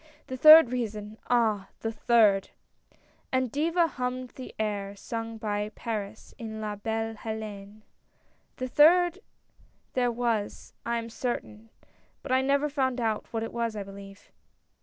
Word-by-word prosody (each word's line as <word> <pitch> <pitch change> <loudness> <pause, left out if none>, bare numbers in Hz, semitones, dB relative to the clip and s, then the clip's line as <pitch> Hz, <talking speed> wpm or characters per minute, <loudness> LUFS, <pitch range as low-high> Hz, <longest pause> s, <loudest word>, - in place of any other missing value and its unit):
The 260 - -5
third 310 -1 +9
reason, 215 -3 -4
ah! 220 -5 +2
the 225 - -2
third! 220 -4 +3 0.4
" - - -35
and 260 -2 0
Diva 335 +4 +2
hummed 255 -3 -4
the 255 +1 -10
air 205 -2 -2
sung 225 +2 -5
by 210 -1 -2
Paris, 215 -2 -5
in 220 -2 -6
La 210 -1 -3
Belle 225 +2 -3
II4Une, 215 -1 -7 0.4
" - - -40
A 255 - -2
third 340 +6 +5 0.7
there 245 -1 +1
was, 230 -3 -2
I 235 0 0
am 230 0 -5
certain, 225 -2 -4 0.5
but 270 - -6
I 260 0 +4
never 280 +2 +2
found 260 -3 -1
out 220 -2 -1
what 225 -1 -2
it 225 - -6
was, 230 -2 -2
I 205 - -4
believe. 195 0 -12
225 Hz, 150 wpm, -28 LUFS, 210-255 Hz, 0.7 s, third